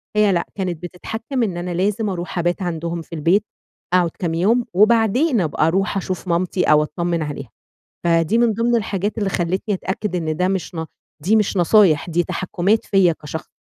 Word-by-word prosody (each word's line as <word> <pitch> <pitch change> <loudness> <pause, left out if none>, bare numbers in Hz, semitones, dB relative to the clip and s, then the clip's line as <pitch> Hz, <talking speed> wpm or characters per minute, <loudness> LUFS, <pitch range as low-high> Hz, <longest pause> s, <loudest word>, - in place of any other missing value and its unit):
هي 210 -1 +4
لأ، 170 -2 0
كانت 180 -4 -3
بتتحكِّم 225 +8 -4
إن 185 -5 -2
أنا 175 +1 -4
لازم 205 +4 0
أرُوح 180 -1 -4
أبات 175 +3 0
عندهم 170 -1 -3
في 165 - -9
البيت، 170 +7 +2 0.5
أقعُد 175 -3 +3
كام 170 -3 -1
يوم، 220 +9 +2
وبعدين 225 - +3
أبقى 155 0 +1
أرُوح 195 +3 0
أشوف 185 0 -4
مامتي 180 +1 0
أو 150 0 +4
أتطمِّن 170 +2 -2
عليها، 140 -5 -6 0.6
فدي 170 +5 +2
من 235 -1 +3
ضمن 235 +2 +1
الحاجات 205 0 -2
اللي 205 - 0
خلّتني 185 +4 -1
أتأكد 190 0 -3
إن 155 -2 -2
ده 180 +1 +1
مش 190 -2 -3
ن 160 - -3 0.4
دي 215 +6 +3
مش 210 -2 +1
نصايح، 175 -3 +4
دي 175 +1 +1
تحكُّمات 190 +4 0
فيّا 190 -4 +3
كشخص. 155 +2 -6
180 Hz, 180 wpm, -20 LUFS, 170-210 Hz, 0.6 s, هي